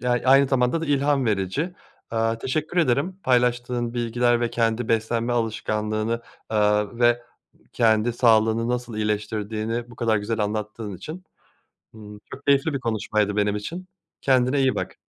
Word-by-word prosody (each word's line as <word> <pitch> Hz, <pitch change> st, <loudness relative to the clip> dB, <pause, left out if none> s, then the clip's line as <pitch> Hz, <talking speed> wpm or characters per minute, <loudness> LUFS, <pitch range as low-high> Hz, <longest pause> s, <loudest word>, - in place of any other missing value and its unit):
Ya, 125 Hz, -, -1 dB
aynı 135 Hz, +1 st, +5 dB
zamanda 130 Hz, +4 st, +1 dB
da 165 Hz, -, -3 dB
ilham 140 Hz, -2 st, +2 dB
verici. 110 Hz, -, -1 dB, 0.4 s
Iıı, 115 Hz, 0 st, 0 dB
teşekkür 155 Hz, +8 st, -3 dB
ederim 160 Hz, +5 st, +1 dB
paylaştığın 125 Hz, -1 st, +1 dB
bilgiler 120 Hz, 0 st, +1 dB
ve 120 Hz, -, 0 dB
kendi 115 Hz, 0 st, 0 dB
beslenme 115 Hz, +1 st, 0 dB
alışkanlığını, 110 Hz, 0 st, -1 dB, 0.3 s
ııı, 105 Hz, +1 st, +1 dB
ve 120 Hz, 0 st, +3 dB, 0.5 s
kendi 115 Hz, 0 st, +2 dB
sağlığını 115 Hz, -1 st, +3 dB
nasıl 120 Hz, -2 st, -3 dB
iyileştirdiğini 110 Hz, +2 st, -2 dB
bu -, -, -14 dB
kadar 115 Hz, -2 st, +1 dB
güzel 110 Hz, +2 st, -2 dB
anlattığın 105 Hz, -1 st, -4 dB
için. 170 Hz, -, -8 dB, 0.7 s
Imm, 105 Hz, -1 st, -11 dB
çok 140 Hz, -, -10 dB
keyifli 140 Hz, +3 st, +3 dB
bir 135 Hz, -, -2 dB
konuşmaydı 110 Hz, -3 st, -1 dB
benim 105 Hz, 0 st, +1 dB
için, 170 Hz, -, -6 dB, 0.3 s
kendine 130 Hz, +1 st, +2 dB
iyi 130 Hz, -1 st, +2 dB
bak. -, -, -4 dB
115 Hz, 145 wpm, -24 LUFS, 110-125 Hz, 0.7 s, aynı